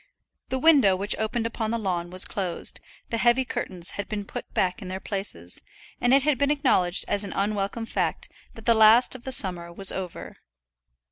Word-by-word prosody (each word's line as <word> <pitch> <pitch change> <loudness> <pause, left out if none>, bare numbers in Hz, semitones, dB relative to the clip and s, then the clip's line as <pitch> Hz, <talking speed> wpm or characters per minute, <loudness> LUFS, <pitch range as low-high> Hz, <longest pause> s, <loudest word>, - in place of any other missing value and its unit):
The 260 - -1
window 265 -9 +5
which 200 +3 0
opened 225 +1 -2
upon 230 -1 -3
the 230 - -1
lawn 180 -5 -3
was 185 +1 +2
closed, 185 -4 -2 0.3
the 230 - -1
heavy 245 +3 +3
curtains 180 -7 -4
had 200 - -6
been 205 -2 -4
put - - -8
back 180 +2 -1
in 190 - -8
their 185 +1 -5
places, 190 - -5 0.4
and 245 - +2
it 270 0 +5
had 290 -3 +1
been 280 - +2
acknowledged 250 - +2
as 205 - 0
an 200 - -5
unwelcome 205 +2 -2
fact - - -2 0.3
that 225 - -12
the 235 - +5
last 220 +2 +5
of 255 -2 -11
the 265 - -4
summer 180 -7 +3
was 195 +2 +1
over. 185 -3 -7
210 Hz, 195 wpm, -25 LUFS, 185-240 Hz, 0.4 s, window